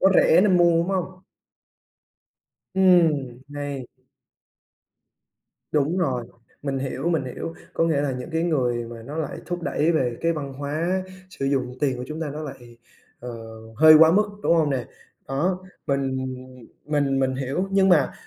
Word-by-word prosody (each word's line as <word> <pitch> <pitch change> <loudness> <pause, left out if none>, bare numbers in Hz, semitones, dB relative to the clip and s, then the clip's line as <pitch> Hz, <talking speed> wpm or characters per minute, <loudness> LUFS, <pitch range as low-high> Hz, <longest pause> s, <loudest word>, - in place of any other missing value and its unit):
Nó 190 - +6
rẻ 170 - +6
nên 190 -3 +4
mua, 170 -1 +4
đúng 170 - 0
hông? 185 -1 -3 1.5
Ừm, 160 -10 +3
hay. 145 -3 -5 1.9
Đúng 150 +4 +1
rồi. 130 -9 0 0.4
Mình 135 -2 -2
hiểu, 135 +4 -3
mình 160 -6 +1
hiểu. 145 +6 -6 0.2
Có 165 - +2
nghĩa 155 -4 +1
là 145 -2 -1
những 125 +6 -6
cái 160 +1 0
người 125 -8 0
mà 115 -1 -9
nó 145 +6 -8
lại 160 -3 -3
thúc 175 -1 -4
đẩy 160 +2 +1
về 125 -6 0
cái 165 0 +2
văn 140 -4 -5
hóa 155 +7 -2 0.3
sử 135 - -5
dụng 130 -2 -1
tiền 135 -4 +1
của 125 - -4
chúng 155 +3 -6
ta 155 -3 -3
nó 155 +2 -6
lại, 120 -5 -10 0.4
ờ, 125 0 -6 0.5
hơi 155 +1 +8
quá 160 0 +8
mức, 210 +2 +4 0.2
đúng 170 - +3
hông 155 -3 +2
nè? 130 -3 -1 0.4
Đó, 170 +8 0 0.3
mình 135 -1 0 0.7
mình 145 -3 +1
mình 130 0 +1
hiểu. 140 +9 -2
Nhưng 195 0 +4
mà, 155 -7 +4
145 Hz, 170 wpm, -24 LUFS, 135-170 Hz, 1.9 s, hơi